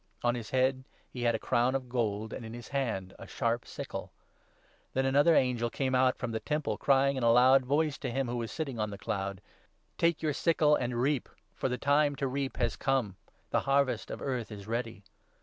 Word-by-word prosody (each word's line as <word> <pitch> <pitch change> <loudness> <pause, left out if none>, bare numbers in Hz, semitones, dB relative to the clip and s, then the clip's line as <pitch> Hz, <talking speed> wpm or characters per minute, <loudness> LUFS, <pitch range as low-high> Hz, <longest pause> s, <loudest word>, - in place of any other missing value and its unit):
On 120 0 +3
his 115 -4 -5
head 130 0 +1 0.3
he 125 - -6
had 120 -1 +2
a - - +1
crown 120 +3 +1
of 130 -2 -2
gold, 110 -3 -2
and - - -6
in 110 +1 -7
his 120 - -9
hand 115 -9 -2
a - - -9
sharp 120 -1 -1
sickle. - - -6 0.8
Then 130 0 +1
another 145 +5 +4
angel 120 -3 +2
came 130 +1 -1
out 130 0 +3
from 120 -2 -3
the 110 - -2
Temple, 150 -8 -2
crying 140 0 +3
in 130 - -2
a - - +4
15 115 - +6
loud 130 +1 +6
voice 150 +1 +1
to - - -3
him 135 +2 -1
who 120 +1 -2
was 115 -2 -4
sitting 135 -7 -4
on 105 0 0
the 100 - -7
cloud 100 -1 -3 0.2
— - - -36
' - - -43
Take 170 -1 +2
your 155 -2 +1
sickle 155 -1 +3
and 120 -2 -2
reap, 135 +1 0 0.2
for - - -2
the 125 - -1
time 145 +2 +2
to 140 - -2
reap 135 +1 -3
has 115 -3 0
come; 130 -8 0 0.4
the - - +3
Harvest 140 -1 +2
of - - -6
Earth 125 -5 -3
is 100 -2 -8
ready.' 115 -2 -4
125 Hz, 225 wpm, -30 LUFS, 115-135 Hz, 0.8 s, 15